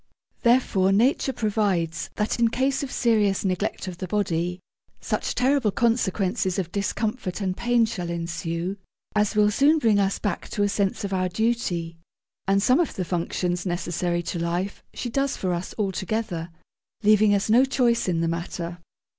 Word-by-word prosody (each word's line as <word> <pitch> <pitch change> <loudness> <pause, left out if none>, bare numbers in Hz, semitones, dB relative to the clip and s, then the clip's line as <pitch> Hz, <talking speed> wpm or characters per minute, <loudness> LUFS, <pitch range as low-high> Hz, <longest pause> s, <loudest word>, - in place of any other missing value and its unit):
Therefore 235 -6 +3
Nature 250 +6 +3
provides 200 -8 -1
that, 210 +2 -1
in 235 - +5
case 265 +3 0
of 275 -3 -4
serious 210 -5 +2
neglect 190 +1 -1
of 180 -1 -7
the 185 - -4
body, 180 -3 -1 0.4
such - - -2
terrible 255 -2 +2
consequences 200 -3 0
of 180 -3 -2
discomfort 210 0 -2
and 190 -2 -1
pain 240 +1 +2
shall 185 -6 -4
ensue, 170 +2 -3 0.4
as 210 +1 +2
will 210 0 +4
soon 285 +8 +4
bring 225 -8 +3
us 195 0 +1
back 205 -4 -3
to 205 - -1
a 205 - +2
sense 200 -1 -1
of 200 -1 -3
our 185 -1 0
duty: 180 -6 -1 0.5
and 195 0 +3
some 255 +6 +4
of 345 - 0
the 185 - -2
functions 175 +1 -1
necessary 175 -1 -1
to 170 - -4
life 175 +4 -2
she 240 - -5
does 275 +2 0
for 185 -2 -1
us 175 +1 -4
altogether, 190 -3 -2 0.5
leaving 210 0 +5
us 195 - 0
no 235 +4 +5
choice 245 -4 +1
in 170 -2 +1
the 165 - +1
matter. 170 +1 -4
200 Hz, 165 wpm, -25 LUFS, 175-230 Hz, 0.5 s, in